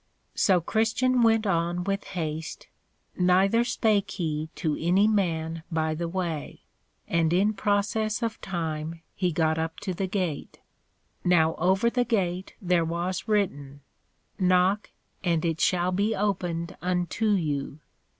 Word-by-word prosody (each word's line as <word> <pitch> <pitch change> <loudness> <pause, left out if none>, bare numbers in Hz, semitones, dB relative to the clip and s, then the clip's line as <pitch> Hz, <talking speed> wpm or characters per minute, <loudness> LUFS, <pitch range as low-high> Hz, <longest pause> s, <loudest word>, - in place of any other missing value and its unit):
So 185 -3 +3
Christian 225 +7 +1
went 225 -1 +4
on 175 -1 0
with 195 +1 -2
haste, 160 -1 -4 0.5
neither 190 +5 +4
spake 210 -4 +1
he 155 -4 -3
to 155 -3 -1
any 190 +5 +4
man 165 -6 0
by 160 -1 0
the 170 +2 -3
way; 170 -4 -4 0.4
and 165 -1 +1
in 200 +5 +3
process 210 +2 0
of 225 -1 -3
time 165 -2 -4
he 180 -2 0
got 160 0 +1
up 160 0 -3
to 190 - -3
the 190 +2 -2
Gate. 180 -6 -3 0.6
Now 165 -3 +4
over 190 +6 +2
the 245 +1 +2
Gate 190 -6 -1
there 180 -4 +2
was 170 +4 -3
written, 145 -10 -1 0.6
_Knock 185 +2 +3 0.4
and 170 -3 +1
it 165 -1 -1
shall 180 0 +2
be 205 +4 +1
opened 175 -4 -2
unto 180 +4 0
you. 150 -5 -2
180 Hz, 135 wpm, -26 LUFS, 165-205 Hz, 0.6 s, went